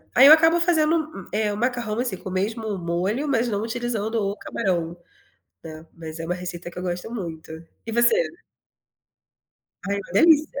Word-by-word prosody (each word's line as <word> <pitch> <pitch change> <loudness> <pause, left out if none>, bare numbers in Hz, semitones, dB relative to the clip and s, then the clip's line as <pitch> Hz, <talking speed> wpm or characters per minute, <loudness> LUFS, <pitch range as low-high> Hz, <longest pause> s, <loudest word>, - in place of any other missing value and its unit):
ai 265 +3 +9
eu 300 - +11
acabo 325 +2 +5
fazendo, 315 - +1
eh, 210 0 0
o - - -5
macarrão, 240 -2 -1
assim, 245 -6 -2
com 190 - -8
o - - -7
mesmo 210 +2 -2
molho, 185 - -1
mas 245 -4 +1
não 205 -3 -1
utilizando 225 -1 -3
o 200 -2 0
camarão, 175 -5 -2 0.7
né. 160 0 -10
Mas 160 -1 -9
é 165 - -5
uma 175 - -1
receita 175 -1 -7
que 175 - -10
eu - - -5
gosto 180 +2 -4
muito. 165 -8 -6 0.4
E 225 - -4
você? 235 - +4 1.7
Ai, 200 - 0
uma 200 -3 -7
delícia. 300 - +4
210 Hz, 175 wpm, -23 LUFS, 180-245 Hz, 1.7 s, eu